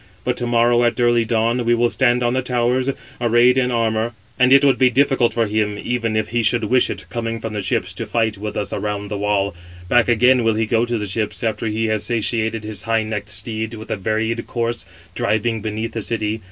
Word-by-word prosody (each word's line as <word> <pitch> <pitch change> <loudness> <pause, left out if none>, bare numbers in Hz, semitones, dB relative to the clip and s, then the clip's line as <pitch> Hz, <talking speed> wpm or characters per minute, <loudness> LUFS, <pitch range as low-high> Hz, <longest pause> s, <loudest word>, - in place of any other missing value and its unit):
But 125 - 0
to 120 - -2
morrow, 120 0 +3
at 120 0 +1
early 120 -1 +3
dawn, 115 +2 +1
we 120 0 +3
will 120 0 +1
stand 125 -1 +2
on 120 0 +1
the 130 - +1
towers, 125 +1 0 0.3
arrayed 120 +1 +4
in 130 -1 +2
armour; 115 -1 0 0.3
and 125 +1 +4
it 140 +1 +7
would 135 - +3
be 130 -1 +5
difficult 135 -1 +2
for 115 -1 +1
him, 105 -1 -1
even 115 -1 -2
if 110 - -1
he 120 +1 0
should 115 +1 +2
wish 125 +4 +3
it, - - -5
coming 115 -1 -3
from 115 -1 -5
the 105 - -2
ships, 95 -1 -1
to 115 +3 -6
fight 110 0 0
with 105 +1 -6
us 105 - -3
around 105 -1 -3
the 105 - -3
wall. 100 -2 0 0.4
Back 120 -1 +4
again 125 +1 +4
will 115 -1 +2
he 110 +1 +1
go 115 +2 +1
to 120 0 -1
the 105 - -3
ships, 105 +3 -3
after 110 0 -1
he 110 +1 -1
has 110 -1 -1
satiated 115 -1 -1
his 105 -1 -3
high 115 -1 +2
necked 105 -1 -4
steeds 110 +1 -4
with 110 - -9
a - - +1
varied 110 +3 -2
course, 120 0 -3 0.3
driving 110 +1 0
beneath 110 +1 -3
the 115 - -3
city. 110 0 -2
115 Hz, 230 wpm, -20 LUFS, 110-120 Hz, 0.4 s, it